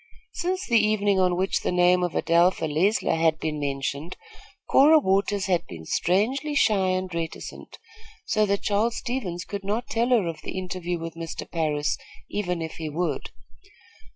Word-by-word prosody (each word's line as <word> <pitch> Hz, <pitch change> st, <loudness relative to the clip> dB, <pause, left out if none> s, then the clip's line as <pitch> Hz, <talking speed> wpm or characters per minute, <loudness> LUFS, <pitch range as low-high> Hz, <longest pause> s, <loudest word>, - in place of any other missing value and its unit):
Since 370 Hz, +2 st, -2 dB
the 230 Hz, -2 st, +4 dB
evening 205 Hz, -2 st, +2 dB
on 180 Hz, -1 st, +3 dB
which 190 Hz, +1 st, +1 dB
the -, -, -2 dB
name 180 Hz, 0 st, +4 dB
of 175 Hz, -2 st, -1 dB
Adelpha 170 Hz, 0 st, +3 dB
Leisler 180 Hz, -, +1 dB
had 160 Hz, -1 st, +2 dB
been 155 Hz, -1 st, -3 dB
mentioned, 140 Hz, +3 st, -3 dB, 0.5 s
Cora 300 Hz, +4 st, +6 dB
Waters 200 Hz, -5 st, +1 dB
had 180 Hz, -3 st, 0 dB
been 80 Hz, -2 st, -9 dB
strangely 250 Hz, -, 0 dB
shy 205 Hz, -8 st, +3 dB
and 185 Hz, -1 st, -1 dB
reticent, 165 Hz, -1 st, -6 dB, 0.5 s
so 215 Hz, -1 st, +2 dB
that 200 Hz, 0 st, 0 dB
Charles 215 Hz, +3 st, +1 dB
Stevens 205 Hz, -9 st, -4 dB
could 200 Hz, -1 st, -6 dB
not 215 Hz, +5 st, -1 dB
tell 235 Hz, +2 st, +1 dB
her 235 Hz, -7 st, +3 dB
of 165 Hz, -2 st, -5 dB
the -, -, -6 dB
interview 180 Hz, -1 st, -3 dB
with 165 Hz, 0 st, -6 dB
Mr. 165 Hz, 0 st, -6 dB
Parris, 150 Hz, -3 st, -1 dB, 0.3 s
even 180 Hz, -5 st, -2 dB
if 160 Hz, -, -7 dB
he 160 Hz, -1 st, -4 dB
would. 170 Hz, +4 st, -2 dB
185 Hz, 165 wpm, -25 LUFS, 165-210 Hz, 0.5 s, Cora